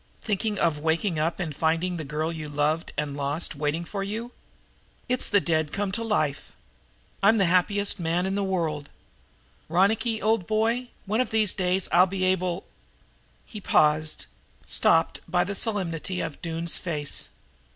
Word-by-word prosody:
"Thinking 210 0 -1
of 165 -5 +1
waking 160 +2 0
up 165 +4 -1
and 160 -6 -3
finding 165 +4 0
the 160 - -4
girl 150 +3 -2
that 165 - -4
you've 150 -2 -7
loved 155 +3 0
and 145 -2 -2
lost 145 +3 -1
standing 150 - -10
waiting 155 +3 -1
for 195 +3 -4
you! 225 +5 -4 0.8
It's 250 0 +1
the 205 - +5
dead 160 -2 0
come 200 -1 -2
to 230 - -2
life. 155 -11 -1 0.7
I'm 210 +3 +5
the 195 - +4
happiest 200 +3 +2
man 170 +2 0
in 190 - -1
the 200 0 0
world. 160 -6 -2 0.8
Ronicky, 215 +6 +2
old 220 -4 +1
boy, 225 +3 +1 0.2
one 215 +4 +1
of 255 - -1
these 215 -3 +3
days 185 0 0
I'll 180 +2 +6
be 190 0 -3
able 185 -1 0 0.4
" - - -35
He 210 - -9
paused, 155 -2 +2 0.4
stopped - - +2
by 175 +1 +3
the 200 +3 -3
solemnity 185 -4 -1
of 155 -3 -5
Doone's 165 0 -1
face. 150 -5 -2
180 Hz, 170 wpm, -26 LUFS, 160-200 Hz, 0.8 s, I'll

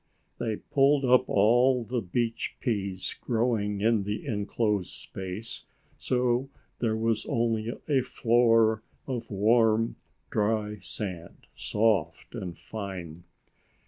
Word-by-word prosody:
They 110 -2 -1
pulled 140 +4 +2
up 125 0 +4
all 120 +5 +4
the 120 +1 -2
beach 115 +5 -2
peas 100 -6 -2
growing 110 -4 0
in 110 0 +3
the 105 +2 -4
enclosed 105 -2 -1
space, 95 +4 -6 0.3
so 125 +1 +1 0.3
there 110 -2 +1
was 115 -1 0
only 115 -1 0 0.2
a 140 -4 +3
floor 115 -3 +3 0.2
of 125 -4 -4
warm 110 +2 +3 0.3
dry 105 -1 0
sand, 90 -3 -5
soft 105 -5 0
and 90 -2 -6
fine. 90 -6 -7
110 Hz, 110 wpm, -28 LUFS, 105-120 Hz, 0.3 s, up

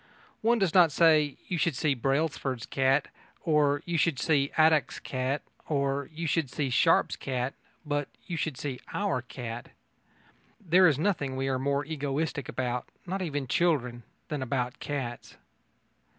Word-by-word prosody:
One 235 +2 +3
does 195 -6 +1
not 175 -4 +6
say: 155 -2 +4
"You 175 - -2
should 165 -4 +1
see 145 +2 +2
Brailsford's 135 -1 -1
cat" 135 +1 +2 0.3
or 145 -3 +2
"You 170 -2 0
should 160 -3 +2
see 140 +1 +2
Adcock's 155 -1 +4
cat" 130 +2 -2 0.3
or 140 -2 0
"You 165 +2 -5
should 160 -2 +1
see 135 0 -2
Sharp's - - +3
cat," 130 0 -2 0.3
but 145 -1 -1 0.2
"You 175 - -4
should 160 -5 -2
see 135 -2 -4 0.2
our 200 -11 0
cat." 120 -1 -7 0.9
There 185 -1 +5
is 145 -5 +3
nothing 150 -6 0
we 135 +1 -1
are 130 -1 0
more 140 +2 0
egoistic 145 -1 -2
about 125 -1 -2 0.2
not 190 +2 -3
even 145 -6 -2
children 130 -5 +1 0.3
than 150 -3 -3
about 125 0 -2
cats. 130 -5 -5
145 Hz, 150 wpm, -29 LUFS, 130-160 Hz, 0.9 s, not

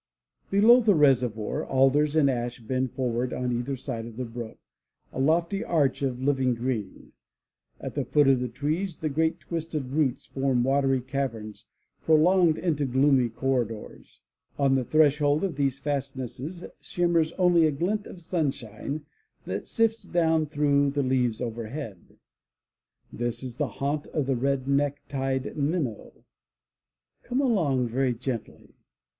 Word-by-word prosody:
Below 225 +5 +6
the 215 -4 +4
reservoir, 125 -7 +2
alders 140 +3 +2
and 155 -3 +4
ash 120 -2 -2
bend 130 +2 -2
forward 125 -1 -1
on 125 -1 -2
either 120 +3 -2
side 115 -3 -5
of 115 -1 -11
the 130 - -3
brook, 115 -1 -7 0.6
a - - -5
lofty 170 +8 +1
arch 155 - +1
of 130 -3 -1
living 130 -3 +2
green. 115 -5 -4 0.7
At - - -6
the - - -1
foot 145 -2 +3
of 135 -2 +4
the 125 0 -2
trees 155 - -2
the 155 - 0
great 160 +3 0
twisted 160 -5 -4
roots 145 -3 0
form 135 -3 0
watery 135 0 +2
caverns 120 -6 -4 0.4
prolonged 165 +1 +4
into 155 -5 0
gloomy 130 -1 +3
corridors. 115 -3 -3 0.4
On 140 -1 +3
the 130 -1 +2
threshold 150 +1 +3
of 190 -6 -1
these 140 -2 0
fastnesses 140 +3 -4 0.2
shimmers 170 -2 +1
only 175 -3 +4
a - - +1
glint 190 +9 -2
of 175 - -11
sunshine 145 - -3 0.4
that 95 +2 -4
sifts 225 0 +1
down 160 -2 +1
through 145 -1 +2
the 140 0 -1
leaves 125 -3 +1
overhead. 115 - -6 1.0
This 120 +1 -3
is 125 -2 -7
the - - 0
haunt 145 +2 -3
of 150 - -2
the 135 0 0
red 135 +1 -1
necktied 140 -1 -1
minnow. 145 - -3 1.0
Come 250 +2 -2
along 165 - +2
very 130 +1 0
gently. 120 -1 -6
140 Hz, 140 wpm, -26 LUFS, 125-155 Hz, 1.0 s, Below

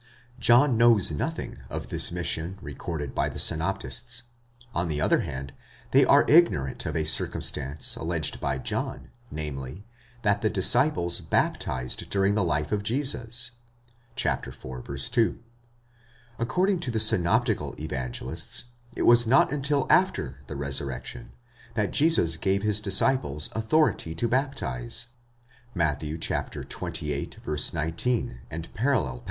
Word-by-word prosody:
John 120 +1 +5
knows 115 -6 +5
nothing 75 - -4
of - - -5
this - - +1
mission, 85 +1 -2
recorded 75 -2 -6
by - - 0
the - - -8
synoptists. 115 +8 +1 0.5
On 85 +1 0
the 75 -2 -2
other - - +3
hand, 70 +1 -5 0.4
they - - +6
are - - +5
ignorant 110 - +3
of - - -3
a 80 - +1
circumstance 70 -2 -1
alleged 80 -1 -1
by 70 -1 -1
John, - - -4 0.2
namely, 75 - -6 0.4
that 100 -1 +2
the 110 - +2
disciples 95 - +4
baptized 65 0 -1
during 100 0 +2
the 105 -1 +1
life 75 -3 -1
of 105 - 0
Jesus 120 0 -1 0.7
(iv. 65 +2 -3
2). 115 -2 +2 1.0
According 180 +11 +1
to 155 - -3
the 115 -2 -1
synoptical 90 -5 +2
Evangelists, 65 -6 -4 0.3
it - - -1
was 120 0 +6
not 130 +2 +4
until 140 -1 0
after 70 - +2
the 75 - -6
resurrection, 70 - -3 0.4
that 105 -3 0
Jesus 140 - +3
gave 95 +4 0
his 105 -1 +1
disciples 95 - +1
authority 110 - +1
to 120 - 0
baptize 120 - -1 0.7
(Matt. 80 -5 +1
xxviii. 75 -1 -3 0.2
19, 80 - -1 0.3
parall.). 100 - 0
90 Hz, 120 wpm, -26 LUFS, 75-120 Hz, 1.0 s, they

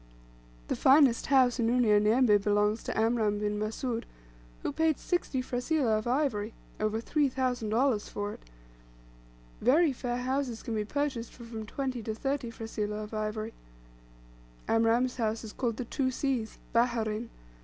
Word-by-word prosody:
The - - -1
finest 270 -3 +5
house 260 -2 +4
in 230 -1 +2
Unyanyembe 220 -1 +4
belongs 210 +1 +2
to - - -3
Amram 220 -2 +2
bin 210 0 -1
Mussoud, 225 +2 -3 0.6
who - - -1
paid 320 -2 +2
sixty 320 -8 -1
frasilah 250 -1 +1
of 215 - -6
ivory 240 -5 0 0.2
over 215 +1 0
$3,000 250 -3 0
for 205 0 -4
it. - - -11 1.2
Very 290 +5 +4
fair 245 -1 -3
houses 255 -2 -2
can 230 - -4
be 215 -1 -1
purchased 270 -2 -2
for 240 - -12
from 225 -2 -7
twenty 260 -1 -3
to 220 0 -4
thirty 270 +1 -2
frasilah 215 -2 -4
of 210 - -10
ivory. 215 +1 -3 1.1
Amram's 230 +3 +2
house 225 -1 -1
is 215 - -8
called 235 -4 -2
the 250 - -3
"Two 260 +2 0
Seas" 255 -4 -2 0.2
"Baherein." 230 -1 +1
235 Hz, 145 wpm, -30 LUFS, 215-260 Hz, 1.2 s, finest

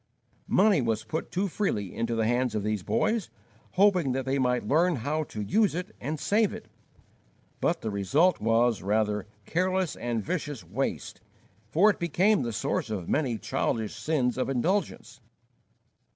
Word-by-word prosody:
Money 200 -5 +4
was 110 -2 -1
put 155 +8 -4
too 190 +3 0
freely 130 - -2
into 115 0 -1
the 110 -1 +1
hands 120 0 +1
of 105 - -1
these 105 -1 -1
boys, 215 - 0 0.4
hoping 180 -8 +3
that 130 0 -2
they 135 +1 0
might 125 -4 +1
learn 170 +6 +3
how 145 +6 -1
to 110 -7 -7
use 205 - +2
it 180 +4 -5
and 150 +4 -3
save 210 +4 +2
it; - - -10 0.9
but - - 0
the 110 - -3
result 140 - +2
was, 115 0 +2
rather, 105 +1 0 0.2
careless 185 0 0
and 120 -3 -2
vicious 145 - -3
waste, 110 +11 -4 0.5
for 195 - +5
it - - -9
became 185 +5 +2
the 120 -2 -2
source 110 +1 -2
of 100 -6 -4
many 130 -7 0
childish 110 +2 -2
sins 130 -5 0
of 130 - 0
indulgence. 170 +11 -1
135 Hz, 160 wpm, -28 LUFS, 110-180 Hz, 0.9 s, for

